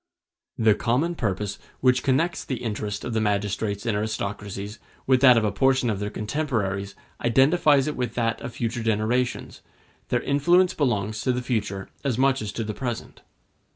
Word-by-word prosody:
The 110 -2 +5
common 130 +12 0
purpose 105 - -2 0.2
which 125 -1 +3
connects 155 +6 +1
the 125 -3 -4
interest 105 -2 -3
of 120 - -3
the 110 - +1
magistrates 100 0 -1
in 115 - +1
aristocracies 105 -1 -4 0.3
with 130 -1 +3
that 125 -3 +8
of 115 - +3
a 105 - +1
portion 130 -2 +2
of 100 - -3
their 105 0 -2
contemporaries 105 -6 -2 0.3
identifies 135 +3 +4
it 150 - -2
with 125 -1 -3
that 115 -2 0
of - - -5
future 120 0 -2
generations; 115 +3 -1 0.5
their - - 0
influence 175 +6 +3
belongs 110 -6 -1
to 130 - +1
the 125 0 -2
future 105 -6 -2 0.2
as 130 -5 0
much 135 -1 +2
as 105 -1 -4
to 115 - -3
the 110 0 -4
present. 120 -2 -5
115 Hz, 170 wpm, -25 LUFS, 105-130 Hz, 0.5 s, that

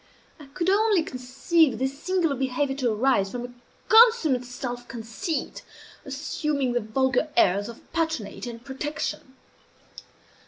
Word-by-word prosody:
I 295 - -12
could 335 +6 -3
only 405 -2 +3
conceive 265 +3 +1
this 265 +3 -3
singular 360 -6 +1
behavior 270 +1 -1
to 250 -4 +1
arise 215 -3 +2
from 245 +3 -5
a 245 - -11 0.3
consummate 445 - +5
self 245 0 -6
conceit 235 - -4 0.4
assuming 280 -1 -2
the 245 - +2
vulgar 260 +6 0
airs 200 +4 +3
of 235 - -10
patronage 320 -10 -2
and 235 +1 -8
protection. 275 -1 -5
265 Hz, 125 wpm, -25 LUFS, 245-315 Hz, 0.4 s, consummate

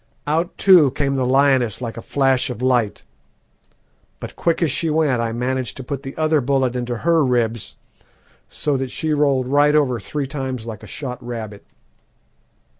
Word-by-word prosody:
Out, 165 +4 -1
too, 180 -8 +6
came 140 +1 -1
the 130 -2 0
lioness 130 -4 +2
like 115 -3 -5
a 115 - -7
flash 135 0 +1
of 125 - -6
light, 125 -4 0 1.2
but - - -8
quick 170 0 0
as 155 - +1
she 160 +4 -1
went 150 -6 +1
I 115 -1 -1
managed 125 +1 -2
to 135 - -6
put 140 +1 -5
the 135 -1 -9
other 155 -1 +2
bullet 130 -1 0
into 120 -1 -3
her 165 -2 +4
ribs, 115 -4 -1 0.7
so 145 -2 -1
that 130 0 -3
she 155 +4 -2
rolled 140 -4 +1
right 145 +2 +3
over 130 -6 +2
three 145 +3 -3
times 130 -4 -5
like 110 -3 -7
a - - -11
shot 125 -4 -6
rabbit. 110 -4 -7
130 Hz, 175 wpm, -20 LUFS, 125-145 Hz, 1.2 s, too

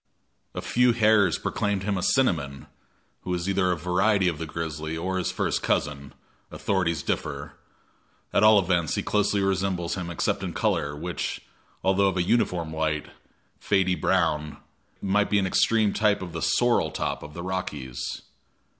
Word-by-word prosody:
A - - -4
few 125 0 +3
hairs 110 -3 +4
proclaimed 100 -2 -1
him 100 0 0
a 95 - -2
cinnamon, 80 - +1 0.6
who 90 - -5
is 85 +1 -3
either 95 -2 +2
a 90 - 0
variety 95 +4 +2
of 80 -4 -1
the 80 - -4
grizzly 80 0 -4
or 95 +3 -2
his 90 - -1
first - - -1
cousin 70 -1 -1 0.3
authorities 85 -6 -1
differ; - - -3 0.8
at - - +3
all 110 0 +7
events, 90 -4 +1
he - - -1
closely 105 -1 +1
resembles 95 -3 0
him 90 -2 -4
except 85 - -1
in - - -4
color, 70 0 0
which, 85 +4 -4 0.4
although 95 +1 +3
of 95 -1 -1
a 90 - +2
uniform 85 -6 0
light, 80 -1 -1 0.5
fady 95 -2 +2
brown, 75 -6 0 0.5
might 105 +1 +2
be 105 - +3
an 100 - +2
extreme 105 +2 +2
type 105 -2 +2
of 85 -3 -8
the 80 - -4
"sorrel 120 -1 +2
top" - - -3
of 75 0 -10
the 85 - -6
Rockies. 75 -9 -4
90 Hz, 165 wpm, -26 LUFS, 80-100 Hz, 0.8 s, all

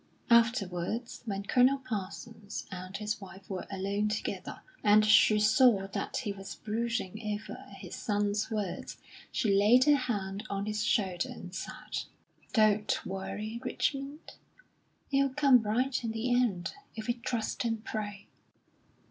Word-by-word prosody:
Afterwards, 230 -1 +2
when 200 -1 -2
Colonel 255 +5 +4
Parsons 215 -2 -6
and 185 +1 -6
his 210 0 -3
wife 190 0 -11
were 190 -2 -5
alone 200 +2 -1
together, 215 - -4 0.2
and 210 0 +6
she 215 0 +6
saw 215 -1 +5
that 200 0 -3
he 230 -6 -2
was 195 -1 -7
brooding 225 -2 -2 0.2
over - - -10
his - - -8
son's 205 0 0
words, 210 -5 -3 0.3
she 210 -4 +1
laid 210 +6 +6
her 295 +1 +6
hand 205 -6 -2
on 200 0 -2
his 210 0 -1
shoulder, 190 -5 +1
and 180 -1 -9
said: - - -5 0.5
"Don't 215 -2 +3
worry, 210 +4 -4
Richmond; 275 +3 -3 0.7
it'll 275 -1 +2
come 275 -4 +6
right 245 +5 0
in 225 -1 -2
the 235 +2 0
end, 225 -8 +1 0.2
if 220 -1 -5
we 240 - +1
trust 235 -1 -2
and 225 -2 -2
pray." 205 -2 -4
215 Hz, 140 wpm, -31 LUFS, 200-235 Hz, 0.7 s, and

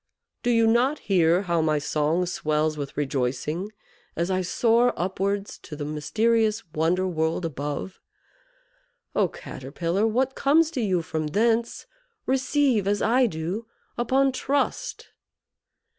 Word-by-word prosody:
Do 245 - -1
you 230 -1 +4
not 245 +6 +3
hear 175 -1 +2
how 170 -3 +1
my 155 -1 +2
song 155 +4 0
swells 155 -2 0
with 145 -2 -6
rejoicing 145 - -2 0.4
as 170 +3 -1
I 185 0 +1
soar 235 +6 +2
upwards 195 +3 -2
to 150 - -9
the 145 0 -5
mysterious 215 +9 +1
wonder 175 +4 +1
world 160 0 -1
above? 150 +4 -4 1.2
Oh, - - +3
Caterpillar; 170 +10 -3
what 255 +4 +1
comes 310 +4 +3
to 265 - -2
you 185 -6 +1
from 160 -1 -3
thence, 230 +7 0 0.4
receive, 265 -5 +1
as 205 0 +1
I 250 +2 +4
do, 185 +5 -4 0.3
upon 265 +3 +2
trust." 280 - -2
190 Hz, 130 wpm, -25 LUFS, 160-235 Hz, 1.2 s, you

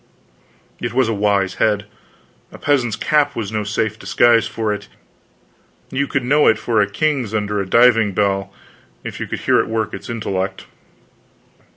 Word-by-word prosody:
It 120 -1 -4
was 130 -1 +2
a 115 - 0
wise 100 -2 +1
head. 105 -1 +2 0.7
A - - -11
peasant's 130 -6 +1
cap 150 +6 +1
was 110 -3 -4
no 110 -1 -2
safe 110 +1 -2
disguise 120 -1 +3
for 110 -2 -2
it; 105 - -7 1.0
you 140 +1 -1
could 135 - -1
know 145 +4 +3
it 110 - +5
for 110 -1 +1
a 100 - +1
king's 130 -2 -1
under 105 -1 -1
a 95 - -5
diving 115 -3 +4
bell, 100 -1 0 0.5
if - - -7
you - - -4
could - - -5
hear - - +3
it - - 0
work 110 -1 -2
its - - -8
intellect. 95 -5 -3
110 Hz, 170 wpm, -19 LUFS, 105-120 Hz, 1.0 s, it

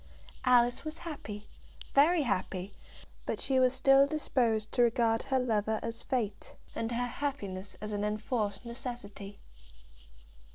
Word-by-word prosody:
Alice 245 -1 +4
was 310 0 -5
happy, 215 -11 -7 0.5
very 310 +3 +5
happy; 195 -3 -2 0.5
but - - -2
she 265 -1 +2
was 255 -1 +5
still 270 +1 +5
disposed 235 -8 +1
to 245 - +2
regard 230 -1 +3
her 265 -1 0
lover 220 -3 +1
as 230 0 -1
Fate, 235 -6 -2 0.2
and 225 +1 -3
her 240 +1 0
happiness 205 -9 -4
as 210 0 -4
an 205 0 -2
enforced 210 0 -2
necessity. 235 -5 -7
235 Hz, 130 wpm, -31 LUFS, 210-265 Hz, 0.5 s, very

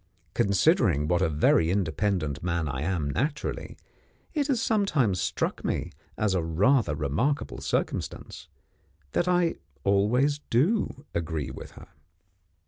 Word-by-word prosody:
Considering 100 - +3
what 90 +2 +2
a 95 - +2
very 80 +2 +3
independent 90 -4 0
man 85 -2 -1
I 65 -2 -3
am 85 -2 -1
naturally, 145 - -3 0.6
it 295 -3 0
has 265 -5 +1
sometimes 155 - +1
struck - - -2
me, - - -2 0.3
as 105 -3 +1
a 90 - +1
rather 90 - +2
remarkable 80 - -1
circumstance, - - -3 0.6
that 175 - 0
I 175 -2 +2 0.3
always 120 +9 +2
do 150 - +1
agree 80 -3 -2
with - - -10
her. - - -13
100 Hz, 125 wpm, -27 LUFS, -, 0.6 s, Considering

